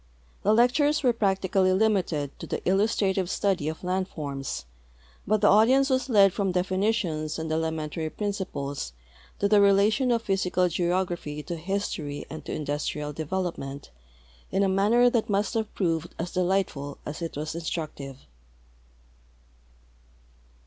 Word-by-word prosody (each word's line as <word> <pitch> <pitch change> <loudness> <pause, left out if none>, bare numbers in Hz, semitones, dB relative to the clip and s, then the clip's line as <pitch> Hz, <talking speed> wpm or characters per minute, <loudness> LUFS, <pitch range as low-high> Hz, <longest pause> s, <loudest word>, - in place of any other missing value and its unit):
The 205 - +2
lectures 285 +7 +3
were 250 -2 +4
practically 190 -3 +2
limited 185 -9 +1
to - - -7
the - - -4
illustrative 195 -1 +2
study 190 -8 0
of 160 - -7
land 185 +1 0
forms, 140 - -5 0.6
but 215 +1 +2
the 210 - +5
audience 260 +7 +5
was 260 0 +1
led 200 -5 +6
from 195 -2 0
definitions 185 -4 0
and 160 -1 -4
elementary 160 0 -2
principles 155 - -4 0.4
to 200 - +1
the 210 +1 +4
rela 200 +1 +5
tion 260 +2 0
of 230 -1 +1
jihysical 185 -3 +1
geography 175 -4 -1
to 170 - -4
history 165 -5 -3
and 155 -1 -7
to - - -5
industrial 150 0 -3
development 155 -3 -4 0.6
in 195 +1 +1
a - - +3
manner 210 +6 +4
that 235 -2 +1
must 205 +2 +1
have 220 -2 -1
proved 165 -3 -1
as 170 +2 -4
delightful 180 -6 -1
as 150 +3 -6
it 165 -3 -4
was 155 +1 -3
instructive. 155 -5 -5
185 Hz, 140 wpm, -26 LUFS, 155-205 Hz, 0.6 s, led